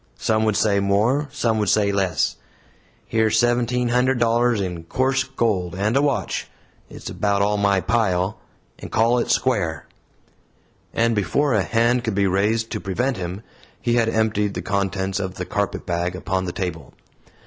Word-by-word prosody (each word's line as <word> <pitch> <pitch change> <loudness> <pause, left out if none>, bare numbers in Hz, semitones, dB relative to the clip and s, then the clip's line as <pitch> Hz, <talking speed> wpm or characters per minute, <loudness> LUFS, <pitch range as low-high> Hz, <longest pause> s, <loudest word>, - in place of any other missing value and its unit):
Some 110 0 +1
would 110 -2 +1
say 100 -2 +2
more; 110 +9 +1
some 115 -6 0
would 105 -2 +1
say 105 -1 +3
less. 95 -6 0 0.7
Here's 110 -1 +1
seventeen 120 0 +1
hundred 125 +2 +2
dollars 120 0 +2
in 90 -4 -4
coarse 130 +7 +1
gold 105 -10 -1
and 105 +5 0
a 140 - +4
watch 145 -2 -1 0.4
it's - - -10
about 100 -1 +1
all 105 +1 +1
my 100 -2 +2
pile 95 -4 0 0.4
and - - -9
call 115 +2 +3
it - - -2
square!" 95 - 0 1.1
And 115 0 +1
before 115 +8 +1
a 105 - +3
hand 115 +4 +1
could 110 -3 -2
be 100 0 +2
raised 105 +4 +1
to 110 - -2
prevent 120 +6 -1
him, 90 +3 -5 0.4
he 120 - 0
had 115 -1 +2
emptied 105 -2 0
the - - -4
contents 95 -1 -1
of 95 -1 -4
the 90 - -4
carpetbag 90 -3 -2
upon 95 0 -2
the 90 - -3
table. 90 -3 -5
105 Hz, 165 wpm, -22 LUFS, 95-120 Hz, 1.1 s, a